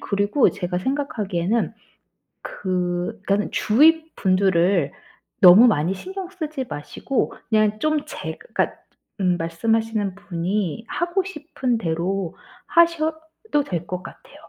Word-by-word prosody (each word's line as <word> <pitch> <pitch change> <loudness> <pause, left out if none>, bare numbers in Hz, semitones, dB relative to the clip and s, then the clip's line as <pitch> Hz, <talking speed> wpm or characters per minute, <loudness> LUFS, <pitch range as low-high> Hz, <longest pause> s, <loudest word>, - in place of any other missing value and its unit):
그리고 205 +6 +2
제가 180 -1 -3
생각하기에는 215 -5 -1 0.7
그 180 +2 -3
그러니까는 200 +1 0
주위 320 +8 +4
분들을 185 -4 +2 0.5
너무 195 +7 +9
많이 170 -2 +1
신경 375 - -7
쓰지 310 -7 -4
마시고 195 - -3
그냥 215 -1 +2
좀 310 +2 0
제 - - -6 0.2
그러니까 - - 0 0.5
음 180 -2 +2
말씀하시는 210 +4 -1
분이 190 +2 -3
하고 345 +2 0
싶은 295 -8 -3
대로 175 0 -2 0.3
하셔도 320 0 +1
될 175 - -4
것 180 0 -4
같아요. - - -13
210 Hz, 260 characters per minute, -22 LUFS, 180-295 Hz, 0.7 s, 너무